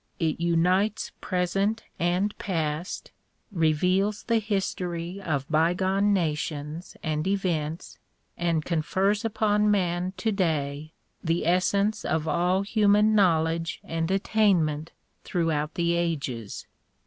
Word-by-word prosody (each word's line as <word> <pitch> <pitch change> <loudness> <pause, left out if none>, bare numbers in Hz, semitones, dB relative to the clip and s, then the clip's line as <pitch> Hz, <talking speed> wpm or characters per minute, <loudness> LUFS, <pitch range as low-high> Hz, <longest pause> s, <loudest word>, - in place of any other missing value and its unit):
It 160 -3 -1
unites 180 +5 +1
present 195 +4 0 0.2
and 180 +4 +1
past, 160 -2 -3 0.4
reveals 185 +4 +1
the 230 -1 +2
history 185 -3 -3
of 140 -7 -2
bygone 185 +6 +2
nations 155 -2 -2
and 155 +1 -1
events, 170 -5 -2 0.4
and 165 -3 0
confers 190 +5 0
upon 210 -1 +2
man 180 -2 0
today 155 -8 -1 0.3
the 165 0 0
essence 200 +4 +2
of 160 0 -1
all 180 +4 +1
human 210 0 +3
knowledge 165 -4 +2
and 165 0 -2
attainment 185 -6 +1 0.3
throughout 160 -4 -1
the 170 0 +1
ages. 140 -11 -3
175 Hz, 100 wpm, -26 LUFS, 160-200 Hz, 0.4 s, human